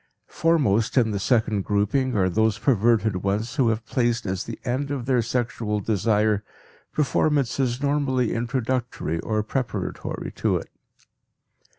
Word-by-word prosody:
Foremost 135 Hz, -10 st, +1 dB
in 115 Hz, -3 st, +4 dB
the 100 Hz, -, -2 dB
second 110 Hz, -2 st, +1 dB
grouping 110 Hz, +5 st, +1 dB
are 95 Hz, -2 st, +3 dB
those 110 Hz, +3 st, +1 dB
perverted 110 Hz, -5 st, +2 dB
ones 105 Hz, -, -2 dB
who 130 Hz, -5 st, +4 dB
have 110 Hz, 0 st, -2 dB
placed 120 Hz, -2 st, 0 dB
as 95 Hz, -1 st, -2 dB
the 115 Hz, -, -6 dB
end 130 Hz, +3 st, -1 dB
of 135 Hz, -4 st, -3 dB
their 130 Hz, -2 st, +2 dB
sexual 115 Hz, -2 st, -1 dB
desire 105 Hz, 0 st, +1 dB, 0.5 s
performances 135 Hz, -2 st, +1 dB
normally 140 Hz, -4 st, +1 dB
introductory 120 Hz, -, -2 dB
or 110 Hz, +2 st, -1 dB
preparatory 125 Hz, +2 st, -3 dB
to -, -, 0 dB
it. -, -, -8 dB
115 Hz, 130 wpm, -24 LUFS, 105-130 Hz, 0.5 s, in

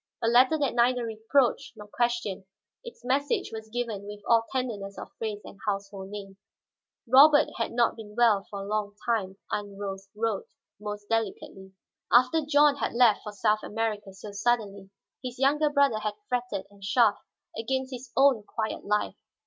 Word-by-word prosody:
A 230 Hz, -, -1 dB
letter 255 Hz, +6 st, +5 dB
that 285 Hz, -3 st, 0 dB
neither 245 Hz, 0 st, +2 dB
reproached 235 Hz, +4 st, 0 dB
nor 210 Hz, -, -10 dB
questioned, 235 Hz, -4 st, -1 dB, 0.4 s
its 470 Hz, -, -11 dB
message 285 Hz, -, 0 dB
was 220 Hz, 0 st, -7 dB
given 220 Hz, -4 st, -4 dB
with 205 Hz, 0 st, -8 dB
all 230 Hz, -1 st, +4 dB
tenderness 215 Hz, -7 st, -3 dB
of -, -, -9 dB
phrase 215 Hz, -2 st, -3 dB
and 195 Hz, -, -12 dB
household 195 Hz, -1 st, -3 dB
name. 195 Hz, -1 st, -8 dB, 0.7 s
Robert 290 Hz, +4 st, +7 dB
had 230 Hz, -, -1 dB
not 235 Hz, 0 st, +2 dB
been 210 Hz, -2 st, -11 dB
well 225 Hz, -4 st, +4 dB
for 200 Hz, -1 st, -6 dB
a -, -, -8 dB
long 205 Hz, -1 st, -2 dB
time, 205 Hz, -5 st, -1 dB
Aunt 205 Hz, -1 st, -4 dB
Rose 195 Hz, -1 st, -6 dB
wrote 220 Hz, -2 st, -2 dB, 0.3 s
most 210 Hz, 0 st, -6 dB
delicately. 195 Hz, -3 st, -3 dB, 0.4 s
After 255 Hz, +7 st, +5 dB
John 290 Hz, -1 st, +4 dB
had -, -, -2 dB
left 235 Hz, -3 st, +5 dB
for 210 Hz, -, -7 dB
South 210 Hz, +1 st, +1 dB
America 215 Hz, -2 st, -3 dB
so 195 Hz, +2 st, -10 dB
suddenly, 200 Hz, -2 st, -1 dB, 0.3 s
his 250 Hz, -1 st, -6 dB
younger 295 Hz, +3 st, +3 dB
brother 280 Hz, -6 st, +3 dB
had 215 Hz, -1 st, -3 dB
fretted 245 Hz, -6 st, -2 dB
and 200 Hz, -1 st, -19 dB
chafed 210 Hz, +1 st, +3 dB, 0.3 s
against 260 Hz, +4 st, -2 dB
his 250 Hz, 0 st, -8 dB
own 270 Hz, -4 st, +5 dB
quiet 220 Hz, +1 st, -4 dB
life. 210 Hz, +1 st, 0 dB
225 Hz, 165 wpm, -27 LUFS, 205-250 Hz, 0.7 s, Robert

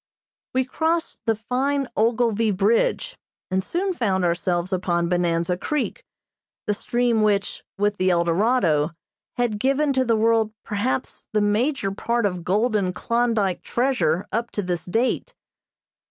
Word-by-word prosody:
We 260 Hz, 0 st, +2 dB
crossed 325 Hz, +5 st, -1 dB
the 225 Hz, -, +3 dB
fine 265 Hz, +5 st, -1 dB
Ogilvie 230 Hz, -1 st, +2 dB
Bridge, 210 Hz, -, +1 dB, 0.3 s
and 190 Hz, 0 st, +1 dB
soon 370 Hz, -, -1 dB
found 195 Hz, -, 0 dB
ourselves 175 Hz, +1 st, 0 dB
upon 175 Hz, -2 st, 0 dB
Bonanza 175 Hz, 0 st, +1 dB
Creek, 300 Hz, -, -2 dB, 0.6 s
the 210 Hz, -, +1 dB
stream 240 Hz, +1 st, +1 dB
which, 205 Hz, -2 st, 0 dB
with 205 Hz, +1 st, +1 dB
the 185 Hz, 0 st, +2 dB
Eldorado, 170 Hz, -2 st, +2 dB, 0.4 s
had 235 Hz, -4 st, 0 dB
given 275 Hz, +4 st, +2 dB
to 260 Hz, -1 st, +2 dB
the 230 Hz, -2 st, +2 dB
world 220 Hz, -1 st, +2 dB
perhaps 230 Hz, +5 st, -2 dB
the 210 Hz, -, +2 dB
major 210 Hz, +1 st, +1 dB
part 235 Hz, +3 st, -1 dB
of 180 Hz, -3 st, -2 dB
golden 205 Hz, 0 st, +1 dB
Klondyke 230 Hz, -4 st, 0 dB
treasure 195 Hz, -, 0 dB
up 230 Hz, +1 st, -1 dB
to 205 Hz, -, -2 dB
this 175 Hz, -2 st, -3 dB
date. 245 Hz, -, -1 dB
215 Hz, 135 wpm, -23 LUFS, 185-245 Hz, 0.6 s, the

